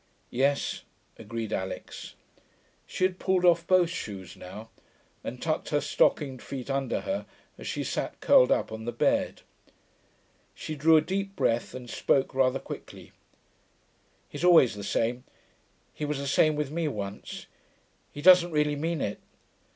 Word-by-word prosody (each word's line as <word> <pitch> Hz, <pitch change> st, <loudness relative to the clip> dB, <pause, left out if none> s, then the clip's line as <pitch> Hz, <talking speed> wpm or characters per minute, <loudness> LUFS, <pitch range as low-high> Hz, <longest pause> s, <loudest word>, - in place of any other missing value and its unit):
'Yes,' 140 Hz, +3 st, 0 dB, 0.4 s
agreed 115 Hz, 0 st, -5 dB
Alix. 95 Hz, 0 st, -5 dB, 0.7 s
She -, -, -3 dB
had 185 Hz, 0 st, +1 dB
pulled 185 Hz, -1 st, +1 dB
off 170 Hz, -1 st, +4 dB
both 180 Hz, -2 st, +4 dB
shoes 95 Hz, -, -6 dB
now, 110 Hz, +5 st, -10 dB, 0.5 s
and -, -, -6 dB
tucked -, -, -2 dB
her -, -, +2 dB
stockinged 135 Hz, -4 st, +1 dB
feet 135 Hz, -1 st, -6 dB
under 135 Hz, -2 st, -1 dB
her 290 Hz, +1 st, -3 dB, 0.3 s
as -, -, -7 dB
she -, -, -2 dB
sat -, -, -3 dB
curled -, -, +5 dB
up -, -, +1 dB
on 110 Hz, 0 st, -6 dB
the 120 Hz, -, -2 dB
bed. 120 Hz, -, 0 dB, 1.1 s
She 155 Hz, -, -6 dB
drew 160 Hz, +2 st, +5 dB
a -, -, +5 dB
deep 195 Hz, +4 st, -3 dB
breath 120 Hz, -10 st, 0 dB
and 125 Hz, -1 st, -8 dB
spoke 135 Hz, +3 st, +1 dB
rather 130 Hz, 0 st, +2 dB
quickly. -, -, -10 dB, 1.2 s
'He's 145 Hz, +3 st, -7 dB
always 170 Hz, -9 st, +6 dB
the 105 Hz, 0 st, -7 dB
same, 120 Hz, +4 st, -1 dB, 0.7 s
he -, -, -7 dB
was 150 Hz, -1 st, -1 dB
the 140 Hz, -, -4 dB
same 155 Hz, +2 st, +3 dB
with 150 Hz, -2 st, -2 dB
me 165 Hz, 0 st, -1 dB
once, 100 Hz, -7 st, -6 dB, 0.7 s
he 145 Hz, -, -8 dB
doesn't 180 Hz, -1 st, +8 dB
really 150 Hz, -2 st, +1 dB
mean 160 Hz, +1 st, -2 dB
it....' 105 Hz, -, -3 dB
140 Hz, 150 wpm, -28 LUFS, 120-170 Hz, 1.2 s, doesn't